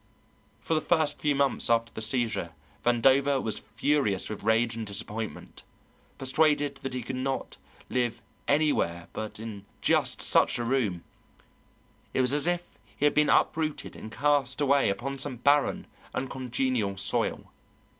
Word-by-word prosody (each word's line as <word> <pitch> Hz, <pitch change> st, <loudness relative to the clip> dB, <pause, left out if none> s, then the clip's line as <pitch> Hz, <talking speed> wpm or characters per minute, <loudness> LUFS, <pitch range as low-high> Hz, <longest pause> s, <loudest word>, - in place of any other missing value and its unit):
For -, -, -1 dB
the 155 Hz, -, +2 dB
first 155 Hz, -4 st, +1 dB
few 145 Hz, -1 st, +1 dB
months 140 Hz, -2 st, +1 dB
after 115 Hz, 0 st, +2 dB
the -, -, -6 dB
seizure 110 Hz, -7 st, -1 dB, 0.3 s
Vandover 135 Hz, +3 st, +4 dB
was 110 Hz, -4 st, -1 dB
furious 110 Hz, -2 st, 0 dB
with 105 Hz, -, -6 dB
rage 115 Hz, +2 st, +2 dB
and 115 Hz, -, -4 dB
disappointment, 105 Hz, +1 st, -5 dB, 0.6 s
persuaded 145 Hz, +1 st, +2 dB
that 135 Hz, -1 st, -5 dB
he 125 Hz, -, -3 dB
could 130 Hz, +2 st, -4 dB
never 135 Hz, +1 st, -1 dB, 0.4 s
live 120 Hz, -2 st, -1 dB, 0.3 s
anywhere 140 Hz, -, +1 dB
but 110 Hz, -1 st, -5 dB
in 110 Hz, -3 st, -7 dB, 0.2 s
just -, -, +2 dB
such -, -, +3 dB
a 120 Hz, -, -2 dB
room; 115 Hz, -9 st, 0 dB, 1.1 s
it -, -, +3 dB
was 125 Hz, +1 st, +3 dB
as 145 Hz, +2 st, +2 dB
if 175 Hz, 0 st, 0 dB, 0.3 s
he 145 Hz, -, +1 dB
had 145 Hz, -, +4 dB
been 150 Hz, 0 st, +3 dB
uprooted 155 Hz, -2 st, +1 dB
and 110 Hz, -, -9 dB
cast 140 Hz, -1 st, +1 dB
away 140 Hz, -4 st, +3 dB
upon 135 Hz, +7 st, -3 dB
some 135 Hz, -1 st, -1 dB
barren, 140 Hz, +4 st, +2 dB, 0.3 s
uncongenial 130 Hz, -5 st, -1 dB
soil. 100 Hz, -, 0 dB
130 Hz, 145 wpm, -28 LUFS, 110-145 Hz, 1.1 s, Vandover